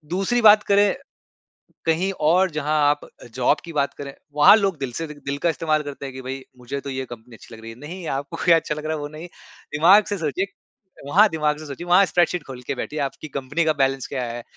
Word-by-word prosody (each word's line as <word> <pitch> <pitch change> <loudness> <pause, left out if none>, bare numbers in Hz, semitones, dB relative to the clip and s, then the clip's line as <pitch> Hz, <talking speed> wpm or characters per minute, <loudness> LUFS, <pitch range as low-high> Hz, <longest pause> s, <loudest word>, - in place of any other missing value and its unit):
दूसरी 220 +6 +1
बात 215 -1 +7
करें 205 0 +4 0.9
कहीं 175 +4 +1 0.2
और 185 +3 +4
जहाँ 155 0 -2 0.2
आप 145 - 0 0.3
जॉब 130 +4 +2
की 170 - -8
बात 140 -2 -1
करें 140 -1 -7 0.2
वहाँ 150 +8 +8
लोग 195 -6 0
दिल 135 -3 -4
से 165 - -3
दि 150 - -9
दिल 140 0 -2
का 170 - +1
इस्तेमाल 155 0 0
करते 140 -1 -7
हैं 135 - -8
कि 130 - -8
भाई 130 +1 -6 0.2
मुझे 130 +3 -5
तो 140 - -7
ये 130 0 -3
कंपनी 115 +1 -11
अच्छी 115 - -14
लग 110 - -13
रही 115 - -8
है। 115 - -11
नहीं 170 +4 -8
आपको 145 +4 -7 0.2
अच्छा 160 -2 0
लग 150 0 -8
रहा 160 - -1
है 150 - -6
वो 145 - -5
नहीं 155 +3 -9 0.5
दिमाग़ 190 +7 +6
से 205 - -2
सोचिए, 165 +4 -1 0.6
वहाँ 205 +8 +5
दिमाग 150 -2 0
से 155 - -9
सोचिए 145 +5 -7
वहाँ 180 +3 +6
स्प्रेडशीट 175 -1 +1
ख़ोल 130 -2 -8
के - - 0
बैठिए 150 +4 -5
आपकी 140 +2 -4
कंपनी 145 +5 -1
का 155 - +3
बैलेंस 135 -1 0
क्या 130 -3 -3
है? 120 0 -6
150 Hz, 235 wpm, -22 LUFS, 135-175 Hz, 0.9 s, वहाँ